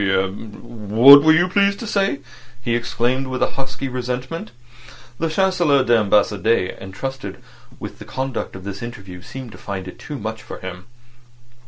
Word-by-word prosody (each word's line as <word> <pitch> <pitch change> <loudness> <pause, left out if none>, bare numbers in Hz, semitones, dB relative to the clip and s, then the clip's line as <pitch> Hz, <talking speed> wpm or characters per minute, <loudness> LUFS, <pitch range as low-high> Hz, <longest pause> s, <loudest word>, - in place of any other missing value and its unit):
"Eh? 95 -1 +2
What 110 +6 +5
were 160 +2 +5
you 165 +3 +4
pleased 200 +1 +2
to - - -4
say?" 195 -9 0 0.4
he 120 0 -1
exclaimed, 120 +2 0
with 130 0 -3
husky 135 0 -3
resentment. 125 +2 -4 0.7
The 165 - 0
Chancelier 170 -6 +3
d'Ambassade 105 -3 +2
entrusted 100 +2 -6 0.4
with - - -8
the - - -9
conduct 130 -5 -4
of 95 - -9
this 100 0 -6
interview 100 -6 -8
seemed 130 +4 -9
to - - -13
find 95 -2 -5
it 95 - -10
too 150 - -7
much 110 0 -5
for - - -9
him. 95 +1 -8
120 Hz, 155 wpm, -21 LUFS, 100-135 Hz, 0.7 s, What